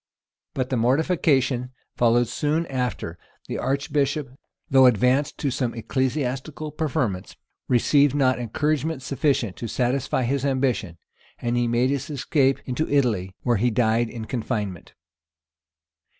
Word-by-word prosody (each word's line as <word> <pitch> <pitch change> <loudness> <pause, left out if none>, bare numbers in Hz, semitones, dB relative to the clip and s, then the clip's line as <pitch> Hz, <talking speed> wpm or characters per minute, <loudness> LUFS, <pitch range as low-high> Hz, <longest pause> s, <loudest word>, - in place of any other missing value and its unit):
But 130 -1 -2
the 130 - +1
mortification 130 -1 +1 0.2
followed 120 0 +3
soon 150 +7 0
after: 125 - -3 0.3
the - - -4
archbishop, 140 0 -1 0.4
though 130 -2 +6
advanced 125 +4 +2
to 140 - -1
some 125 -2 -2
ecclesiastical 135 +4 -2
preferments.[] 140 - -2 0.3
received 140 +3 +3
not 130 -4 +2
encouragement 150 +4 -1
sufficient 135 -7 0
to 115 - -4
satisfy 125 +3 0
his 135 +2 0
ambition; 130 -10 0 0.4
he 120 0 0
made 120 +3 +2
his 140 0 -2
escape 135 -1 +1
into 130 +5 -2
Italy, 110 -10 +1
where 120 -2 +2
he 120 +5 +2
died 115 0 +1
in 115 -1 -6
confinement. 105 -7 -4
130 Hz, 120 wpm, -24 LUFS, 120-140 Hz, 0.4 s, though